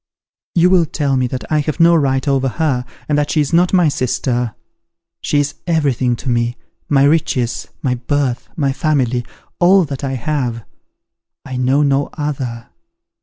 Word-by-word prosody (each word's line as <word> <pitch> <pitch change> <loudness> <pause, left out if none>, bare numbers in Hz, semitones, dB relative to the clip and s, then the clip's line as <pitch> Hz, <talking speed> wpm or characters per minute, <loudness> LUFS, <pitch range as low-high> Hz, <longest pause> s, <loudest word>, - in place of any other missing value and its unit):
You 175 +1 +4
will 175 -4 +4
tell 140 -2 -1
me 130 -1 +1
that 125 -2 -5
I 155 - +3
have 155 +3 -2
no 170 +1 +6
right 135 -3 +1
over 135 -1 +2
her, 130 -3 -1 0.2
and 150 - +1
that 145 0 -1
she 155 - +1
is 145 +1 0
not 175 +1 +4
my 180 -3 +4
sister. 125 -3 -1 0.7
She 145 - +1
is 145 0 0
everything 135 -7 +1
to 130 - -5
me; 120 0 0 0.3
my 140 -2 +4
riches, 140 -6 +1 0.2
my 130 -3 +1
birth, 125 0 -2
my 140 -3 0
family, 130 -6 0 0.4
all 185 +1 +5
that 140 -1 -6
I 135 -1 -2
have! 125 -3 -2 0.8
I 130 - -6
know 130 +3 +2
no 140 0 +1
other. 130 -6 -4
140 Hz, 170 wpm, -17 LUFS, 125-155 Hz, 0.8 s, no